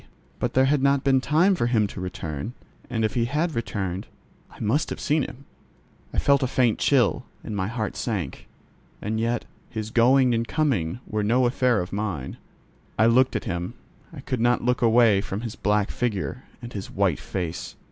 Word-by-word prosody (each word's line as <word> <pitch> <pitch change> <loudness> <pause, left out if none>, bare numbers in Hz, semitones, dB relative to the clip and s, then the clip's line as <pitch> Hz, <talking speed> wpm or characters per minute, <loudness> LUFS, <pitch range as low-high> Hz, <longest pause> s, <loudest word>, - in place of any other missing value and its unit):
But - - -2
there 130 +1 +5
had 140 0 +2
not 140 0 +3
been 135 -1 +3
time 165 +8 +3
for 120 -10 0
him 115 -3 +3
to 100 -2 -6
return, 90 - -5 0.4
and 110 -3 0
if 110 - -1
he 120 -1 +1
had 155 +6 0
returned, 95 -6 -3 0.4
I - - -17
must 115 +8 +1
have - - -5
seen 155 +1 +1
him. 140 +1 -6 0.7
I - - -6
felt 140 0 +4
a 130 - +1
faint 125 -3 +2
chill, 130 -6 +2 0.2
and 105 - -5
my 95 -2 -1
heart 110 -1 -3
sank; 95 - -3 0.5
and 110 +2 -2
yet, 115 +1 0 0.2
his 110 -1 -5
going 125 +2 +5
and 115 0 0
coming 125 - 0
were 110 -1 -2
no 120 +5 +3
affair 125 -2 +2
of 90 - -6
mine. 100 -10 -3 0.6
I 110 - +5
looked 125 +3 +4
at - - -1
him: 90 -4 -4 0.4
I - - -9
could 125 -3 -3
not 120 0 +2
look 125 0 +1
away 115 -3 +5
from 100 +1 -4
his 115 -3 -5
black 105 0 +1
figure 120 +1 -2 0.2
and 120 - -7
his 100 -2 -5
white 95 -6 +1
face. 90 -3 -4
115 Hz, 190 wpm, -25 LUFS, 100-130 Hz, 0.7 s, there